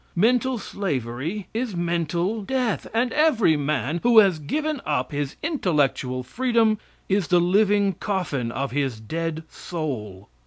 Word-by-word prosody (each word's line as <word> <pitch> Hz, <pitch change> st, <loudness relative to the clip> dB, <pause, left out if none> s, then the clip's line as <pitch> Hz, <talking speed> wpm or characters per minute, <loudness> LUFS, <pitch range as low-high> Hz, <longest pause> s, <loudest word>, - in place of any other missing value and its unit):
Mental 245 Hz, +6 st, +2 dB
slavery 165 Hz, -, -3 dB
is 230 Hz, -3 st, -2 dB
mental 175 Hz, +4 st, -1 dB
death, 250 Hz, +1 st, -1 dB
and 235 Hz, +2 st, 0 dB
every 280 Hz, -, +4 dB
man 145 Hz, +1 st, -1 dB
who 240 Hz, -1 st, +4 dB
has 195 Hz, -7 st, +6 dB
given 300 Hz, -, -2 dB
up 130 Hz, -4 st, -1 dB
his 145 Hz, -1 st, -3 dB
intellectual 145 Hz, -, 0 dB
freedom 225 Hz, -, +1 dB, 0.3 s
is 195 Hz, -3 st, +1 dB
the 175 Hz, -, +4 dB
living 200 Hz, +2 st, +3 dB
coffin 165 Hz, -, -2 dB
of 135 Hz, +3 st, -3 dB
his 135 Hz, -4 st, -1 dB
dead 160 Hz, +7 st, -3 dB
soul. 110 Hz, -, -5 dB
175 Hz, 130 wpm, -24 LUFS, 145-220 Hz, 0.3 s, has